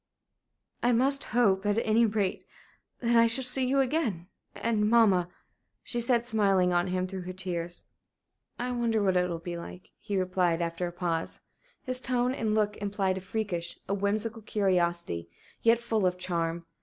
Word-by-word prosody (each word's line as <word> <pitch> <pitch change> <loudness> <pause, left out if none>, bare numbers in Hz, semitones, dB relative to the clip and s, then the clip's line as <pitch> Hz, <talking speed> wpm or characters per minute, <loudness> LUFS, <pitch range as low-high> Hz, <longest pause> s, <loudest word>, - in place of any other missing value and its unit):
"I 245 +1 +3
must 275 +4 +1
hope, 205 -5 +2
at 205 0 +1
any 225 +1 +4
rate, 205 -3 -1 0.6
that 235 -1 +2
I 230 0 +6
shall 235 +4 +1
see 255 +1 +1
you 275 +1 +3
again 245 - -1 0.3
and 215 -2 +1
mamma," 200 -7 +4 0.5
she 240 - -2
said, 235 0 +1
smiling 195 -6 +2
on 175 +1 +2
him 185 0 -1
through 190 0 -5
her 180 +1 -6
tears. 175 -2 -4 0.7
"I 250 +1 -2
wonder 230 -3 +1
what 190 -2 +2
it 180 0 +2
will 170 - -2
be 170 +1 -6
like," 180 +2 -10
he 205 -2 -3
replied, 180 -2 +1
after 170 +1 -2
a - - -5
pause. 170 -2 -3 0.4
His 255 -1 -3
tone 250 0 +1
and 220 -5 -1
look 210 -1 +1
implied 195 -2 -1
a - - -12
freakish, 185 -3 -3
a 195 - -1
whimsical 210 +3 -1
curiosity, 175 - 0 0.3
yet 230 +1 +5
full 225 -4 0
of 180 0 -1
charm. 170 -2 -2
200 Hz, 170 wpm, -29 LUFS, 180-230 Hz, 0.7 s, I